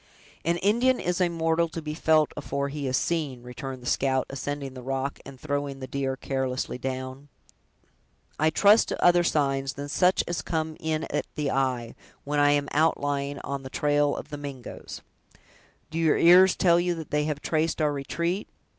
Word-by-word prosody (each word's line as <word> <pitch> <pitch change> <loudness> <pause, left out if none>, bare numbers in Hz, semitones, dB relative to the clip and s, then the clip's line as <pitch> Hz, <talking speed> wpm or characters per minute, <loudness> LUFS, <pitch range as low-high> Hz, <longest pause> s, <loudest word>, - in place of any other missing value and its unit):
"An 170 +1 +1
Indian 235 +7 +2
is 180 +1 -1
a 180 - +3
mortal 165 0 +1
to 165 - -5
be 150 -1 -5
felt 155 -1 +3
afore 140 -1 -3
he 140 -1 -4
is 130 0 +1
seen," 145 -8 -2
returned 125 +1 -7
the - - -11
scout, 130 +1 +1
ascending 140 0 -4
the 130 - -9
rock, 135 +2 -3
and 135 -2 -11
throwing 145 -1 -3
the 130 - -5
deer 135 0 -2
carelessly 130 -2 -2
down. 130 +2 -5 1.1
"I 155 +1 +4
trust 205 +7 +5
to - - -1
other 175 0 +6
signs 135 -4 0
than 145 +1 -6
such 180 +4 +3
as 175 - -2
come 160 -1 -2
in 160 0 -1
at - - -1
the 150 -3 -1
eye, 125 -3 -1 0.3
when 145 +1 -1
I 145 0 +5
am 145 0 +2
outlying 145 -2 0
on 140 -1 -4
the 130 - -8
trail 145 +1 +1
of - - -7
the 145 - -4
Mingoes." 140 -4 -8 0.9
"Do 165 - -2
your 160 -2 +3
ears 180 +2 +7
tell 170 -2 +4
you 175 0 0
that 160 -2 -8
they 150 0 +1
have 150 -2 -2
traced 160 +2 0
our 150 -2 +2
retreat?" 170 +7 -2
145 Hz, 185 wpm, -26 LUFS, 135-165 Hz, 1.1 s, ears